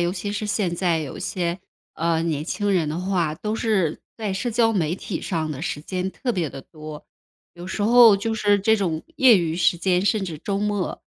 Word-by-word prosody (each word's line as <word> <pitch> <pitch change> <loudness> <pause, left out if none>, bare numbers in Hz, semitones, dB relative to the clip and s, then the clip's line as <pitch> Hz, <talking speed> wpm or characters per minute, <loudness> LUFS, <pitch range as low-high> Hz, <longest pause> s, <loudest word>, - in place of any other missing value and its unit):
尤 175 +1 +1
其 200 +2 -4
是 210 +1 -3
现 200 -4 0
在 170 -2 +1
有 145 -4 -6
些， 180 -2 -2 0.4
呃 165 0 0
年 155 -3 -1
轻 205 +4 -1
人 170 -5 +1
的 155 +2 -3
话， 180 -4 0
都 210 +6 -3
是 210 -9 0 0.2
在 215 -3 -3
社 195 +6 -2
交 225 0 +3
媒 170 -5 0
体 185 -1 -5
上 160 -4 -2
的 140 -3 -5
时 145 -2 -3
间 185 +4 -3
特 245 +5 -3
别 175 -7 -1
地 135 0 -9
多。 155 0 -10 0.5
有 175 +1 -9
时 190 +2 -3
候 230 -1 +7
就 225 +3 -2
是 205 -2 +2
这 220 +3 +3
种 170 -6 -1
业 260 -6 +7
余 165 -3 -1
时 175 0 +3
间， 180 +1 +1
甚 205 -1 +1
至 165 -5 -6
周 195 +5 -3
末， 205 -2 -2
185 Hz, 230 characters per minute, -23 LUFS, 165-205 Hz, 0.5 s, 候